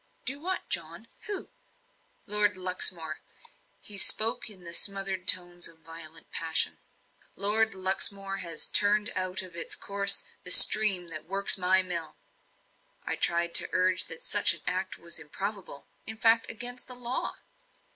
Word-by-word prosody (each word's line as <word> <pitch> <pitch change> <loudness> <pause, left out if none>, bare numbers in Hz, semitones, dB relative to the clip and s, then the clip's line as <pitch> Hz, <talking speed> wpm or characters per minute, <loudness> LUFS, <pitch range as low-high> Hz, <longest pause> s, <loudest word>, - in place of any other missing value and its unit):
"Do 275 +3 -3
what, 370 +4 -7
John? - - -3 0.2
Who?" 405 -3 -8 0.7
"Lord 205 -2 0
Luxmore." 180 -3 0 0.6
He 205 - -5
spoke 220 +4 +3
in 190 -4 -13
the 170 0 -10
smothered 195 0 -2
tones 175 -1 +2
of 165 -1 -11
violent 165 -1 -14
passion. 165 -1 -2 0.6
"Lord 215 +1 -1
Luxmore 195 +1 -2
has 170 -3 -1
turned 210 +1 +3
out 185 0 -2
of 180 -2 -14
its 170 - -1
course 200 0 +1 0.2
the 180 - -4
stream 190 -2 +8
that 155 -1 -11
works 195 +2 +4
my 185 0 0
mill." 170 -3 -7 0.9
I - - -5
tried 170 0 -2
to - - +3
urge 185 0 +1
that 480 - -5
such - - +3
an - - -17
act 185 +1 -4
was 170 -1 -4
improbable; 190 0 -9 0.2
in 220 - -6
fact, 225 0 +1
against 245 +2 -8
the 250 - -2
law. 245 +1 -6
190 Hz, 145 wpm, -25 LUFS, 175-210 Hz, 0.9 s, stream